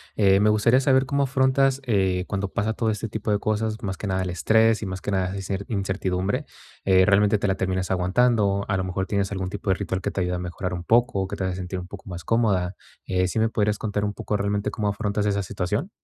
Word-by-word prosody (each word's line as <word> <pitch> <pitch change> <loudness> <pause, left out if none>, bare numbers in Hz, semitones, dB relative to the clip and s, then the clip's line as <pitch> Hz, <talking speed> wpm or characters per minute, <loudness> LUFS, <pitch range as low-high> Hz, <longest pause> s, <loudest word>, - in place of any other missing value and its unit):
eh, 95 -2 +4
me 105 +1 +4
gustaría 110 +4 +4
saber, 130 0 +3
cómo 140 +1 +1
afrontas, 135 0 +2
eh, 95 -5 +1
cuando 100 0 -1
pasa 105 +3 -1
todo 110 0 0
este 110 +1 -4
tipo 110 0 -4
de 105 -1 +2
cosas, 110 +1 -1
más 95 -1 -3
que 105 - -5
nada 95 0 0
el 95 - -2
estrés, 110 +6 +3
y - - -3
más 95 -1 -5
que 105 - -3
nada, 95 0 0
esa 95 -1 -5
cer 100 0 -3
incertidumbre, 95 -2 -1 0.4
eh, 95 -1 +5
¿realmente, 105 +1 +4
te 100 - 0
la 95 - +1
terminas 95 -1 -2
aguantando?, 100 +2 +2
a 95 - +1
lo 95 - -1
mejor, 95 +1 -2
tienes 100 -1 -1
algún 95 -1 -3
tipo 100 0 -5
de - - +5
ritual 95 -1 -3
que 100 - -3
te 95 - -2
ayuda 90 0 -1
a - - -5
mejorar 90 +1 -4
un 90 -1 -5
poco, 110 -4 +2
que - - -5
te 95 - -4
haga 95 -1 -1
sentir 90 0 -5
un 90 0 -6
poco 95 0 -11
más 85 -1 -6
cómoda, 100 -4 +1 0.3
eh, 90 -1 +1
¿sí 100 - -4
me 110 0 +3
podrías 105 -2 0
contar 105 -1 -2
un 105 - -2
poco, 105 - -2
realmente 100 0 -1
cómo 105 -3 -2
afrontas 100 +1 -1
esa 100 -1 0
situación? 105 - -2
100 Hz, 250 wpm, -24 LUFS, 95-110 Hz, 0.4 s, eh